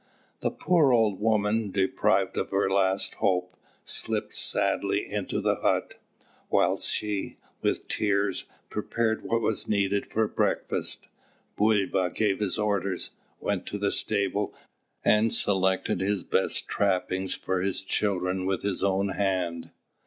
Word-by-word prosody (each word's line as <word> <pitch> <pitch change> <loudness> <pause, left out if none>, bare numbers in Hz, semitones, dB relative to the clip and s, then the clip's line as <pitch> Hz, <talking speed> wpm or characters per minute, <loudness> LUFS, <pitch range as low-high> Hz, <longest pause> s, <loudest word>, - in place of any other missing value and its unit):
The - - 0
poor 165 -7 +3
old 110 -5 +3
woman, 110 0 +1
deprived 95 0 +1
of - - -2
her 100 0 +1
last 95 0 +1
hope, 90 -1 +1 0.3
slipped - - -1
sadly - - +1
into - - -2
the - - +1
hut. - - 0 0.6
Whilst - - +2
she, 105 -2 -2 0.2
with - - -1
tears, 100 -2 0 0.3
prepared 115 -1 -1
what 115 0 0
was 110 - -1
needed 100 -1 +1
for 110 0 +1
breakfast, - - -1 0.5
Bulba 100 -3 +2
gave 105 -3 +1
his 105 -4 -1
orders, 100 -3 0 0.3
went 100 -3 -2
to 105 - -3
the 100 0 0
stable, 100 -1 0 0.5
and 110 +1 +4
selected 95 -2 +1
his 100 -1 0
best - - 0
trappings 95 -1 0
for 95 -1 -2
his 95 0 -1
children 95 -2 0
with 95 -1 -1
his 100 -2 -1
own 100 0 +1
hand. 95 -4 -1
100 Hz, 130 wpm, -27 LUFS, 95-105 Hz, 0.6 s, and